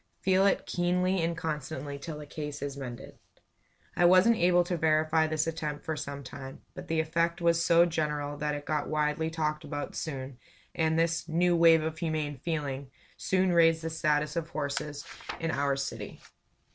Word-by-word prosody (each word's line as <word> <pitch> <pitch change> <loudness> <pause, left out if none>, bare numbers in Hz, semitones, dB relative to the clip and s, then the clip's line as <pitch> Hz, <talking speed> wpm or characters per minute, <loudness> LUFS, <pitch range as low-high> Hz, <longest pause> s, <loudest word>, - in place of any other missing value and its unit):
Feel 190 +1 +4
it 195 - +1
keenly 180 +1 +1
and 165 0 -1
constantly 150 -3 -4
till 150 +2 -6
the 150 - -8
case 150 -1 -6
is 140 -1 -4
mended." 125 -4 -8 0.8
I - - +2
wasn't 185 +6 +6
able 175 0 +4
to 175 +1 -2
verify 160 0 +2
this 155 0 0
attempt 155 -2 -4
for 160 - -2
some 140 -1 -6
time; 135 +1 -9
but - - -9
the 160 0 0
effect 170 +2 0
was 170 -1 +3
so 170 +1 +6
general 150 -3 -2
that 150 0 -1
it 145 0 -7
got 150 -1 -1
widely 150 +1 0
talked 155 -2 -2
about 145 -1 -5
soon; 135 -4 -5 0.3
and 160 -1 +1
this 165 0 +1
"new 175 +2 +2
wave 165 -1 +6
of 160 0 -3
humane 155 -3 -2
feeling" 140 -4 -3 0.3
soon 185 -1 +1
raised 165 -1 +4
the 165 - -3
status 150 0 0
of 165 -1 -2
horses 145 -1 -3 0.3
in 165 -1 -1
our 140 -1 +1
city. 140 0 -5
160 Hz, 175 wpm, -29 LUFS, 145-170 Hz, 0.8 s, wasn't